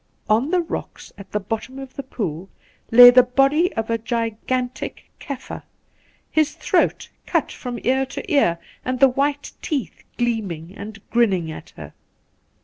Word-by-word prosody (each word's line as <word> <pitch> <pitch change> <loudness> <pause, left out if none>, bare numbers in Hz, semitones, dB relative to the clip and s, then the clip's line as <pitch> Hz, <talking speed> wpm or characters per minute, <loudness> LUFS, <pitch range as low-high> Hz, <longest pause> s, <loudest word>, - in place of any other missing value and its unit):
' - - -37
On 250 +7 0
the 360 0 +2
rocks 330 - -7
at 200 -1 -13
the 210 - 0
bottom 225 +6 -5
of 270 -1 -9
the - - -4
pool 190 - -5 0.4
lay 245 +1 +11
the 250 +1 +8
body 275 +8 +2
of 225 0 -2
a 230 - +1
gigantic 235 +2 -3
Kaffir, 270 -2 -7 0.7
his 310 -2 +2
throat - - +1 0.2
cut - - 0
from 245 -1 -6
ear 265 +1 +2
to 330 +5 -5
ear, 175 -12 +3 0.3
and 255 0 -2
the 270 0 +7
white 285 +2 -1
teeth 270 - -3
gleaming 200 -9 -2
and 200 0 -8
grinning 190 -9 +2
at - - -9
her. - - -9
245 Hz, 155 wpm, -22 LUFS, 215-270 Hz, 0.7 s, lay